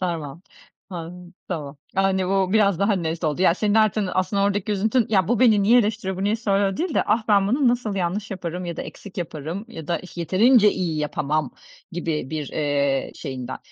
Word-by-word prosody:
Tamam. 165 -3 -4 1.5
Yani, 190 -1 +2
bu 195 -1 +1
biraz 200 -5 +3
daha 200 +1 +2
net 170 -2 -2
oldu. 155 +4 0
Ya, 170 -2 +5
senin 210 +1 0
artın, 215 -2 +2
aslında, 190 +2 0
oradaki 205 +1 0
üzüntün, 220 +4 +1
"Ya, 195 -3 +2
bu 240 -1 +1
beni 215 -5 +5
niye 235 +5 +5
eleştiriyor, 205 -4 -1
bu 190 - -2
niye 210 +2 +1
soruyor?" 200 -3 0
değil 340 - -2
de - - +3
"Ah, 220 +2 +2
ben 200 -1 +4
bunu 260 +2 +3
nasıl 240 -4 0
yanlış 195 +3 -2
yaparım 180 -1 -5
ya 170 -2 -5
da - - -4
eksik 200 -2 -10
yaparım 165 +3 -5
ya 160 -9 -9
da 170 - 0
ih 185 - -13
yeterince 210 +5 +4
iyi 165 -4 -2
yapamam," 150 -1 -1 0.4
gibi 160 -5 -3
bir, 155 -3 -3
eee, 140 -2 0
şeyinden. 130 -4 -6
190 Hz, 190 wpm, -23 LUFS, 165-210 Hz, 1.5 s, Ya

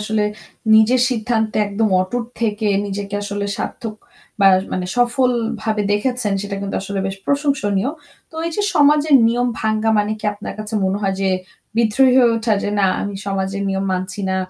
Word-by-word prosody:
আসলে 215 0 0 0.5
নিজের 220 +4 +5
সিদ্ধান্তে 220 -2 -1
একদম 210 +2 0
অটুট 235 +6 -2 0.2
থেকে 215 0 0 0.2
নিজেকে 200 0 -5
আসলে 205 0 -3
সার্থক 225 -2 -5 0.5
বা 195 - +6 0.3
মানে 180 -1 -2
সফলভাবে 235 -3 +1
দেখেছেন 230 0 0
সেটা 200 -1 -4
কিন্তু 195 0 -3
আসলে 200 0 -4
বেশ 195 - -4
প্রশংসনীয়। 275 -7 0 0.4
তো - - -20
এইযে 335 +5 -2
সমাজের 295 +1 +4
নিয়ম 245 +1 +1
ভাঙ্গা 220 0 +1
মানে 210 +1 +1
কি - - -12
আপনার 205 - -7
কাছে 215 +1 -5
মনে 190 +1 0
হয় 195 -1 0
যে 195 - +1 0.5
বিদ্রোহী 235 +3 +4
হয়ে 240 - +5
ওঠা? 225 0 0
যে - - -1
না 195 - +4
আমি 205 0 -4
সমাজের 195 0 -2
নিয়ম 195 0 -1
মানছি 185 +2 -3
না। 190 - 0
215 Hz, 165 wpm, -19 LUFS, 200-240 Hz, 0.5 s, বা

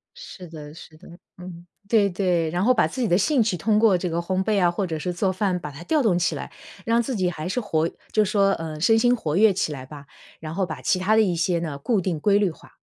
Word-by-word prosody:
是 180 -2 -11
的 150 -2 -10
是 155 -1 -14
的， 180 - -16 0.3
嗯， 180 -1 -10 0.2
对 205 -3 +3
对。 175 -3 0
然 175 +3 -1
后 255 +4 +4
把 220 - +2
自 260 - -5
己 235 - +1
的 175 - +3
兴 275 +5 +2
趣， 210 -4 +1
通 210 +5 +1
过 215 -5 +4
这 180 0 -3
个 165 - -3
烘 185 +2 -1
焙 210 -2 +1
啊， 175 - +4
或 190 +3 -2
者 160 -3 -4
是 180 +3 -3
做 190 +2 0
饭 185 -2 -1
把 150 -3 -7
它 150 +5 -10
调 305 - +1
动 190 -8 +2
起 - - 0
来， - - -7 0.3
让 230 +1 +2
自 245 +2 -3
己 185 -3 0
还 160 -1 -6
是 250 +6 -2
活 165 -5 0 0.2
就 215 -1 +2
说， 200 -1 +2
呃 160 -3 -5
身 225 +6 +4
心 245 +1 +3
活 160 -7 -2
跃 215 -1 +5
起 180 -4 -1
来 130 -3 -7
吧。 145 0 -12 0.3
然 155 0 -7
后 190 +2 0
把 155 -7 -7
其 185 - +1
它 210 +4 +2
的 220 - +5
一 180 -5 +1
些 170 +1 0
呢， 155 -4 -4
固 200 - 0
定、 170 -4 -2
规 200 +4 +3
律 200 -4 +1
化。 - - -18
185 Hz, 295 characters per minute, -23 LUFS, 165-210 Hz, 0.3 s, 跃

